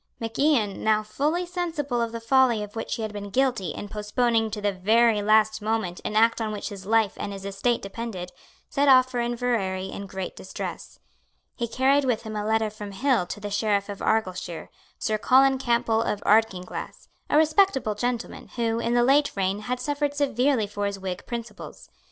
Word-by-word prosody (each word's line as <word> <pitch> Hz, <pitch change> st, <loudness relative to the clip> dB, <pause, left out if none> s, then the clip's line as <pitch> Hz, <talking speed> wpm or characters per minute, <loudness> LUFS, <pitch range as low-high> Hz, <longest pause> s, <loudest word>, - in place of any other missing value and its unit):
Mac 225 Hz, -1 st, -5 dB
Ian, 255 Hz, -9 st, +2 dB
now 215 Hz, -1 st, +3 dB
fully 300 Hz, +11 st, -1 dB
sensible 325 Hz, -8 st, -2 dB
of 230 Hz, -1 st, -1 dB
the 230 Hz, -, -5 dB
folly 235 Hz, -2 st, +3 dB
of 210 Hz, +1 st, -10 dB
which 225 Hz, -, -3 dB
he 225 Hz, -, -4 dB
had 215 Hz, -1 st, -4 dB
been 205 Hz, -1 st, -6 dB
guilty 250 Hz, -4 st, +1 dB
in 205 Hz, -, -6 dB
postponing 225 Hz, +2 st, 0 dB
to 215 Hz, 0 st, -5 dB
the 205 Hz, 0 st, 0 dB
very 215 Hz, +3 st, +3 dB
last 215 Hz, +1 st, +3 dB
moment 215 Hz, -5 st, -2 dB
an 210 Hz, -, -3 dB
act 230 Hz, +1 st, +4 dB
on 220 Hz, -1 st, -1 dB
which 210 Hz, +1 st, -4 dB
his 195 Hz, -2 st, -9 dB
life 220 Hz, -2 st, +3 dB
and 200 Hz, -, -4 dB
his 195 Hz, -1 st, -8 dB
estate 200 Hz, +5 st, -1 dB
depended, 195 Hz, -3 st, -6 dB, 0.4 s
set 285 Hz, 0 st, +1 dB
off 255 Hz, -1 st, +6 dB
for 245 Hz, -, -2 dB
Inverary 235 Hz, -6 st, -1 dB
in 200 Hz, -, -7 dB
great 190 Hz, -1 st, -5 dB
distress. -, -, -7 dB, 0.6 s
He 235 Hz, -, -2 dB
carried 265 Hz, +5 st, +2 dB
with 245 Hz, -4 st, 0 dB
him 220 Hz, -1 st, -6 dB
a 210 Hz, -, -2 dB
letter 220 Hz, 0 st, +1 dB
from 210 Hz, -1 st, -8 dB
Hill 245 Hz, -4 st, +1 dB
to 205 Hz, -, -6 dB
the 205 Hz, 0 st, -6 dB
Sheriff 205 Hz, -1 st, 0 dB
of 200 Hz, -, -6 dB
Argyleshire, 185 Hz, -6 st, -1 dB, 0.3 s
Sir 215 Hz, -1 st, -1 dB
Colin 265 Hz, +3 st, +4 dB
Campbell 235 Hz, -3 st, +1 dB
of 210 Hz, -, -1 dB
Ardkinglass, 205 Hz, -4 st, 0 dB, 0.2 s
a -, -, +3 dB
respectable 310 Hz, -, +3 dB
gentleman, 240 Hz, +2 st, -3 dB
who, 230 Hz, -1 st, 0 dB
in 235 Hz, +1 st, 0 dB
the 240 Hz, -, +4 dB
late 285 Hz, +3 st, +4 dB
reign, 195 Hz, 0 st, 0 dB
had 245 Hz, +4 st, -3 dB
suffered 290 Hz, 0 st, -1 dB
severely 270 Hz, -4 st, +1 dB
for 205 Hz, 0 st, -3 dB
his 200 Hz, 0 st, -4 dB
Whig 185 Hz, -2 st, -6 dB
principles. 235 Hz, -1 st, -8 dB
225 Hz, 195 wpm, -25 LUFS, 205-250 Hz, 0.6 s, off